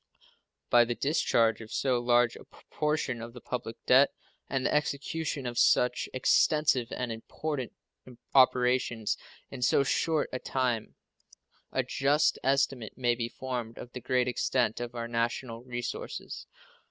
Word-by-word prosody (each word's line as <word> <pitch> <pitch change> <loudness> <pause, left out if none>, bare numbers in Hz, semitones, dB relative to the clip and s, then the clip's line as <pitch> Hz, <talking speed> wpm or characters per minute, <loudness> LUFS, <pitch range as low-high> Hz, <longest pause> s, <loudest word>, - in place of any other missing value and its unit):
By 120 0 +7
the 120 0 -2
discharge 115 -7 +2
of 110 - -11
so 130 -3 +1
large 120 0 +3
a - - -11
proportion 150 -5 -3
of 115 0 -8
the 125 - -9
public 115 -2 -5
debt 130 +3 +6 0.4
and 135 -1 -1
the - - +1
execution 150 0 -1
of 120 -1 -2
such 125 0 +3
extensive 130 -1 +2
and 125 -2 -3
important 130 +4 -4 0.6
operations 125 -3 +3 0.4
in 135 - -7
so 140 - +4
short 150 +4 0
a 130 - -2
time 125 -5 -2 0.8
a - - 0
just 145 +3 +2
estimate 135 -4 0
may 120 -2 +2
be 115 -1 -3
formed 120 -3 -5
of 125 - -9
the 125 - -7
great 125 +1 +1
extent 125 -2 0
of 120 0 -5
our 115 0 -3
national 115 0 -2
resources. 120 -1 -5
125 Hz, 140 wpm, -29 LUFS, 120-135 Hz, 0.8 s, By